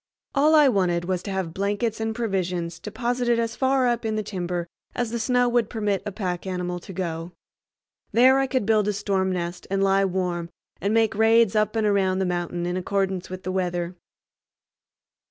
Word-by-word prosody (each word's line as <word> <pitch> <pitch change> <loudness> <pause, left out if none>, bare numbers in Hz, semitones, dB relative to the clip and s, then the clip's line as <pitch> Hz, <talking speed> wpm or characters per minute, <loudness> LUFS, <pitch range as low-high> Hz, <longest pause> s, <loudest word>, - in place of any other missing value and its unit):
All 300 +3 +4
I 300 -2 +7
wanted 180 -7 +1
was 185 -1 -1
to 200 - -6
have 190 -4 -2
blankets 205 +4 -1
and 220 0 -2
provisions 180 -6 -2
deposited 240 +4 -1
as 230 -1 -1
far 265 -1 +2
up 240 -1 0
in 220 -1 -1
the 215 - -1
timber 180 -3 -3 0.3
as 240 -2 -1
the 235 - -2
snow 245 +1 +2
would 235 -2 +1
permit 210 -4 -1
a - - -2
pack 185 -2 -3
animal 180 -1 -3
to 185 - -11
go. 170 -2 -4 0.8
There 260 +3 +6
I 270 - +1
could 255 -4 0
build 215 -1 +3
a 210 - +1
storm 190 -2 0
nest 175 -1 -4
and 195 0 +1
lie 195 0 +3
warm, 180 -2 -2 0.3
and 200 - 0
make 225 -1 +3
raids 225 0 +4
up 215 +1 +1
and 220 -1 +1
around 195 -2 +2
the 190 - 0
mountain 175 -1 -2
in 175 +1 -1
accordance 190 0 -1
with 185 +1 -7
the 185 - -3
weather. 180 -1 -1
195 Hz, 190 wpm, -24 LUFS, 180-225 Hz, 0.8 s, I